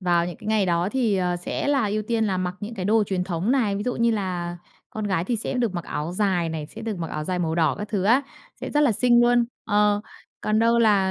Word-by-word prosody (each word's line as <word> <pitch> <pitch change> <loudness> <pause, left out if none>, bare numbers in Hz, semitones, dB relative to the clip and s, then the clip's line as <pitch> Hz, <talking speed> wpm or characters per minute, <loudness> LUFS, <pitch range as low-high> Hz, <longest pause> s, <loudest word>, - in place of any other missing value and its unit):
Vào 175 -2 +2
những 175 - -6
cái - - -12
ngày 215 -2 +2
đó 170 +1 +1
thì, 235 -6 +1
ờ, 180 -1 0
sẽ 175 - -3
là 275 -6 +2
ưu 210 +1 -1
tiên 225 +1 0
là 195 -3 0
mặc 180 0 -2
những 215 +3 -6
cái 190 -4 -4
đồ 215 +3 +3
truyền 185 -2 -1
thống 180 +4 -2
này, 220 -7 +1
ví 205 - -3
dụ 250 +2 -2
như 235 0 +2
là 180 -5 -2 0.3
con 215 - -4
gái 185 -4 0
thì 235 +5 -1
sẽ 225 - -1
được 235 -6 0
mặc 175 -1 -4
áo 155 +3 -4
dài 185 -3 +1
này, 160 -2 -4
sẽ 220 +8 -10
được 220 -4 -3
mặc 165 -1 -4
áo 155 0 -4
dài 180 +2 -2
màu 165 -2 -1
đỏ 160 -3 +2
các 210 - -5
thứ 200 -3 -1
á, 240 +7 +4 0.4
sẽ - - -5
rất 295 - +2
là 285 -6 +4
xinh 240 +2 +4
luôn. 240 0 +4 0.2
Ờ, 205 0 +2 0.4
còn 215 0 +1
đâu 230 +1 +3
là, 205 -4 +3
205 Hz, 275 wpm, -24 LUFS, 180-225 Hz, 0.4 s, á